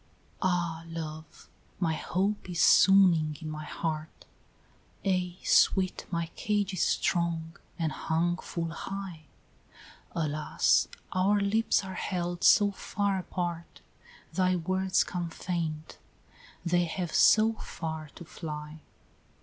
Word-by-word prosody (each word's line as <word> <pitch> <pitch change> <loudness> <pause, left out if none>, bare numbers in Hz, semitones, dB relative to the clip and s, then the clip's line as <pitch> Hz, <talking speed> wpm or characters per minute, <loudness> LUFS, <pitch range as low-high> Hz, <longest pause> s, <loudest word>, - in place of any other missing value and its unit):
XXII. - - -34
"Ah! 175 -3 0
Love, 155 -2 -8 0.3
my 165 -3 +1
hope 190 +5 -2
is 175 -2 -3
swooning 170 -6 +5
in 155 -2 -6
my 155 0 -6
heart, 155 0 -4 0.4
" - - -31
"Ay, 180 -2 0
sweet, 185 -1 +3
my 170 -2 -1
cage 205 -1 0
is 185 - -2
strong 170 -2 0 0.2
and 160 -2 -1
hung 170 +3 0
full 165 -2 -4
high 185 -3 -6 0.5
" - - -21
"Alas! 150 0 +2 0.2
our 195 +3 +2
lips 205 +2 +2
are 190 - -6
held 175 -1 -3
so 205 -1 +6
far 200 0 -1
apart, 175 -2 -5 0.5
Thy 185 -1 +2
words 185 +2 +1
come 175 -2 -4
faint, 165 -3 -4 0.7
they 175 0 +2
have 170 0 -4
so 220 +1 +5
far 160 -7 -6
to 175 - -10
fly! 150 -1 -7
175 Hz, 125 wpm, -29 LUFS, 160-190 Hz, 0.7 s, so